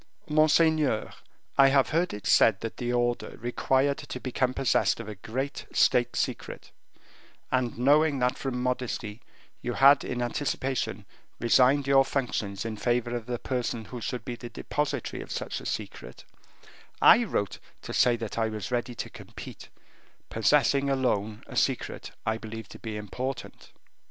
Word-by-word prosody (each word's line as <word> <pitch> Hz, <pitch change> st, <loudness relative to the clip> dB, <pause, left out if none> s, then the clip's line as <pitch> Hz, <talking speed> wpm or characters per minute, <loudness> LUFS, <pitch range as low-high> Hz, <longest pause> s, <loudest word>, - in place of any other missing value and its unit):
"Monseigneur, 155 Hz, -4 st, +3 dB, 0.5 s
I 135 Hz, -, +9 dB
have 135 Hz, -1 st, +3 dB
heard 170 Hz, +3 st, +1 dB
it 105 Hz, -, -8 dB
said 105 Hz, -4 st, +5 dB
that 115 Hz, -, -5 dB
the 120 Hz, 0 st, -2 dB
order 120 Hz, 0 st, -1 dB
required 130 Hz, +4 st, +1 dB
to 125 Hz, -, -7 dB
become 130 Hz, 0 st, 0 dB
possessed 130 Hz, -2 st, +1 dB
of 115 Hz, -, -7 dB
a 110 Hz, -, -5 dB
great 130 Hz, +8 st, -5 dB
state -, -, +3 dB
secret, -, -, -3 dB, 0.8 s
and 125 Hz, -3 st, 0 dB
knowing 145 Hz, +4 st, +4 dB
that 125 Hz, 0 st, +1 dB
from 125 Hz, -2 st, -3 dB
modesty 125 Hz, -3 st, -3 dB, 0.4 s
you 120 Hz, -, -3 dB
had 140 Hz, +3 st, +6 dB
in 125 Hz, -, -3 dB
anticipation 135 Hz, +1 st, -2 dB, 0.3 s
resigned 130 Hz, +4 st, +4 dB
your 135 Hz, 0 st, +5 dB
functions 110 Hz, -7 st, -2 dB
in 110 Hz, -1 st, -4 dB
favor 120 Hz, +1 st, 0 dB
of 120 Hz, -1 st, -5 dB
the 125 Hz, -1 st, -2 dB
person 120 Hz, -3 st, -3 dB
who 125 Hz, +1 st, -8 dB
should 125 Hz, +2 st, -4 dB
be 125 Hz, -, -4 dB
the 120 Hz, 0 st, -8 dB
depositary 150 Hz, +4 st, -3 dB
of -, -, -9 dB
such -, -, -4 dB
a -, -, -6 dB
secret, -, -, -6 dB, 0.7 s
I 240 Hz, -, +7 dB
wrote 100 Hz, -, -2 dB, 0.2 s
to -, -, -6 dB
say 120 Hz, -1 st, +4 dB
that 115 Hz, -1 st, -5 dB
I 110 Hz, -1 st, +1 dB
was 110 Hz, 0 st, -5 dB
ready 120 Hz, 0 st, -2 dB
to -, -, -5 dB
compete, -, -, -10 dB, 0.6 s
possessing 140 Hz, +4 st, +3 dB
alone 110 Hz, -6 st, 0 dB
a -, -, -10 dB
secret -, -, -1 dB, 0.2 s
I 110 Hz, 0 st, 0 dB
believe 110 Hz, -2 st, -7 dB
to -, -, -11 dB
be 110 Hz, -2 st, -5 dB
important." 125 Hz, +5 st, -6 dB
125 Hz, 155 wpm, -27 LUFS, 115-135 Hz, 0.8 s, I